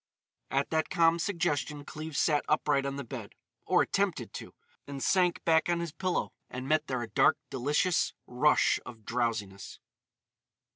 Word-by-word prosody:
At 135 +1 0
that 160 0 +1
calm 165 0 +3
suggestion 150 -5 -1
Cleves 155 0 -6
sat 150 -3 +2
upright 145 -2 +2
on 140 - -3
the 140 - -4
bed,—or 120 - -2
attempted - - -1
to. - - -8 0.3
But 140 -1 -5
sank 180 -2 +2
back 160 -1 +4
gently 175 - +2
on 170 - -1
his 170 -2 -4
pillow 185 +3 -2 0.2
and 130 +1 -6
met 155 0 +2
there 130 -2 -2
a - - -5
dark, - - +3
delicious 150 +7 +1
rush 140 +5 +3
of 115 -4 -11
drowsiness. 115 -5 -3
150 Hz, 155 wpm, -30 LUFS, 130-165 Hz, 0.3 s, back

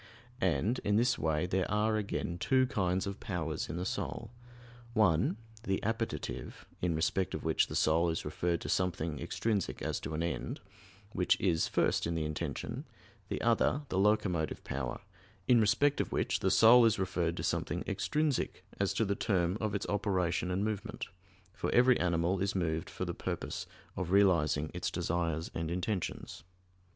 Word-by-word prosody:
And 95 - +1
in 105 - +1
this 120 +2 +3
way 80 +1 +1
there 90 +1 0
are 105 +1 +2
again 100 -4 -2
two 130 +4 +3
kinds 95 -7 0
of 100 0 -5
powers 80 -5 -3
in - - -4
the 90 - -2
soul: 115 +3 -4 0.6
one 95 -3 +3 0.2
the 95 -4 -1
"appetitive" 115 +1 -3 0.2
in 85 -2 +1
respect 85 +4 0
of - - -5
which - - +2
the - - -6
soul 80 +2 +3
is 80 - -2
referred 85 +3 -1
to - - -5
something 85 -5 -1
extrinsic 105 +2 -1
as - - -1
to 80 - -5
an 80 - -1
end, 85 - -3 0.5
which 90 - +2
is 85 -4 +2
first - - +1
in 85 - -1
the 80 -1 -1
intention; 75 0 -4 0.5
the - - -2
other 120 +5 +2
the 95 - 0
"locomotive" 95 -6 +1
power 65 -2 -4 0.5
in 120 -3 +6
respect 125 +7 +3
of - - -4
which - - 0
the - - +1
soul 120 +2 +7
is 115 -2 +4
referred 90 -3 -1
to - - -3
something - - -1
extrinsic 150 -3 -1
as 100 -1 +1
to 115 - +2
the 100 - +1
term 95 -4 +1
of 105 -2 -1
its 100 - -2
operation 95 -4 0
and 95 +3 0
movement; 110 +1 -4 0.4
for - - -3
every 125 0 +5
animal 90 +1 +1
is 100 0 0
moved 80 -3 -1
for - - -4
the - - -3
purpose - - -4 0.3
of 95 -3 -3
realizing 85 -6 +3
its - - -2
desires 80 -1 -1
and 80 -1 -3
intentions. 90 +2 -3
95 Hz, 170 wpm, -32 LUFS, 85-110 Hz, 0.6 s, soul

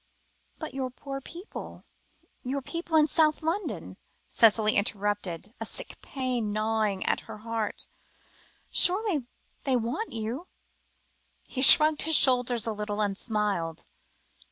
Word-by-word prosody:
"But 315 - -8
your 265 -1 -3
poor 275 +2 -8
people 345 - -10 0.6
your 270 +1 -4
people 335 +2 -2
in 305 - +5
South 310 +1 +1
London," 350 +6 -4 0.3
Cicely 215 -1 +3
interrupted, 205 -2 -2
a 225 - -4
sick - - -2
pain 250 -5 -3
gnawing 215 -2 -1
at - - 0
her - - -8
heart; 225 0 -4 0.9
"surely 360 - +2 0.4
they 265 -2 0
want 245 - -3
you?" 230 +10 -5 1.0
He 260 - -6
shrugged 305 +3 +9
his 320 0 +3
shoulders 245 -4 +4
a 225 - -2
little, 210 0 -5
and 205 -2 -1
smiled. 205 -7 -2
240 Hz, 125 wpm, -27 LUFS, 210-300 Hz, 1.0 s, shrugged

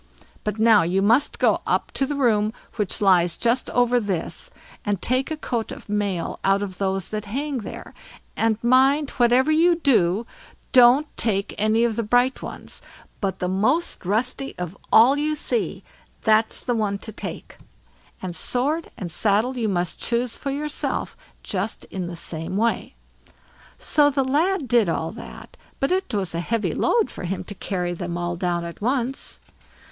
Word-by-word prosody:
But 210 0 -2
now 220 -1 +6
you 175 +3 +1
must 230 +7 +3
go - - +2
up - - 0
to 270 - -1
the 290 - -2
room 220 -5 +2 0.2
which 210 0 0
lies 175 -4 +4
just 240 +2 +1
over 245 0 +3
this, 200 - -4 0.3
and 205 -2 -1
take 255 - +1
a 315 - -3
coat 235 -6 -3
of - - -10
mail 205 -4 -2
out 195 +1 +2
of 190 -3 -6
those 195 -1 -1
that 215 -1 -4
hang 270 +5 -3
there; 215 - -8 0.4
and 225 -1 +1
mind, 270 +4 +4
whatever 250 +5 +4
you 335 +3 +4
do, 230 - +2 0.5
don't 250 +3 +6
take 200 -3 0
any 215 +2 +3
of 235 -2 0
the - - +2
bright 245 +4 +2
ones, - - -8 0.4
but 190 -2 -2
the 180 - -2
most 215 - 0
rusty 245 +8 -1
of 180 +1 -5 0.2
all 260 +6 +6
you 305 +1 0
see, 445 +9 -1 0.4
that's 220 0 +2
the 245 - 0
one 210 -3 0
to 220 - -9
take; 215 - -7 0.7
and 180 -2 -4
sword 290 - -1
and 175 -4 -5
saddle 215 +8 +1
you 230 -3 -1
must 175 -2 -1
choose 235 0 -1
for 280 - -5
yourself 295 +2 -3 0.3
just - - -3
in 185 -3 -3
the 175 - -6
same 165 +2 -4
way." 230 +2 0 0.8
So 295 -1 +3
the 275 -1 +1
lad 310 +4 +1
did 230 -5 +3
all 165 0 -2
that; 225 - -11 0.2
but 275 - 0
it 375 -6 0
was 195 -6 -2
a 170 - -2
heavy 220 +5 -1
load 460 -3 +1
for - - -7
him 185 +2 -3
to - - -8
carry 180 -3 -3
them 175 -1 -4
all 175 0 -2
down 175 -1 -1
at 170 +3 -9
once. 255 +3 -2
225 Hz, 170 wpm, -23 LUFS, 195-260 Hz, 0.8 s, now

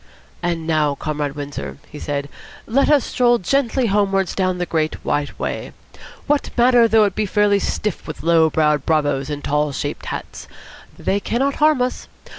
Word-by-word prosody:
"And 170 -2 -2
now, 155 -3 +1
Comrade 150 -1 -3
Windsor," 145 0 -6
he 150 - -8
said, 145 -1 -3 0.4
"let 260 +5 +2
us 295 -3 +4
stroll 240 -1 +3
gently 260 +4 +1
homewards 195 -3 +1
down 185 -1 0
the 180 - -1
Great 155 -2 -1
White 145 0 -1
Way. - - -4 0.5
What 295 -1 0
matter 240 -1 +5
though 220 -1 +4
it 200 - -1
be 215 +1 -1
fairly 205 0 +3
stiff 210 -1 -3
with 150 -4 -7
low 165 -1 +4
browed 150 -2 +2
bravoes 145 -3 0
in 145 -1 -5
tall 150 0 0
shaped - - -4
hats? - - -6 0.5
They 200 - 0
cannot 270 +7 -1
harm 300 -4 +4
us. 250 - -4
180 Hz, 170 wpm, -20 LUFS, 150-230 Hz, 0.5 s, matter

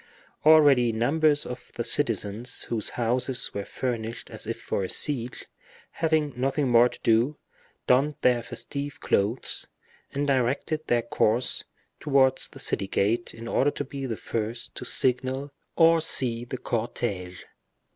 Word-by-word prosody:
Already 145 -6 +6
numbers 145 +6 +2
of 125 0 -8
the 120 - -2
citizens 115 -2 +1
whose 110 -3 -1
houses 125 +2 0
were 100 - -3
furnished 115 -2 -4
as - - -6
if - - -4
for 100 - -2
a 95 - -4
siege, 125 -5 0 0.5
having 155 -3 0
nothing 135 +3 0
more 120 +1 +6
to - - -11
do, 120 +6 +2 0.5
donned 140 +4 +3
their 125 -1 +3
festive 140 +4 -6
clothes, 105 +6 0 0.4
and 140 +1 -1
directed 140 +4 0
their 120 -1 +2
course 120 +1 0 0.3
towards 135 -3 +2
the - - -14
city 95 - -1
gate, 110 +5 0
in 115 +1 -9
order 135 +4 +2
to - - -4
be 135 0 -6
the 115 -3 -4
first 115 +1 -4
to - - -5
signal 130 +3 0 0.3
or 165 0 +5
see 120 -6 +2
the 130 - -5
cortege. 105 -7 -4
125 Hz, 145 wpm, -26 LUFS, 115-140 Hz, 0.5 s, Already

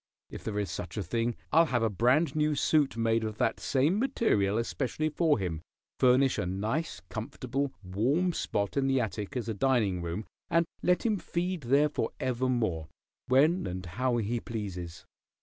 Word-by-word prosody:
If - - -8
there 105 -2 -3
is 105 -2 -1
such 90 +4 -6
a 105 - -1
thing 115 +6 -1 0.2
I'll 165 +1 +5
have 120 -4 +1
a 115 - +3
brand 125 - +2
new 150 0 +2
suit 145 -3 +2
made 115 0 +2
of 110 -1 -4
that 115 - +1
same 145 +9 +2
material 110 - +1
especially 135 +6 -1
for 155 0 +2
him, 85 -6 -3 0.4
furnish 130 +1 +4
a 90 - -1
nice 105 - -2
comfortable, 130 +4 -3
warm 130 - +1
spot 100 -9 -2
in 135 -1 +2
the 135 -1 +3
attic 110 0 -3
as 120 - -3
a 110 - -1
dining 105 -6 +1
room, 85 +5 -4 0.2
and 170 0 +3 0.2
let 180 +4 +2
him 215 -3 +2
feed 175 0 -2
there 140 +4 +3
forevermore, 125 - -1 0.4
when 155 +8 +3
and 90 +1 -5
how 120 +8 0
he 115 +2 -1
pleases. 95 -6 -6
120 Hz, 170 wpm, -29 LUFS, 105-145 Hz, 0.4 s, I'll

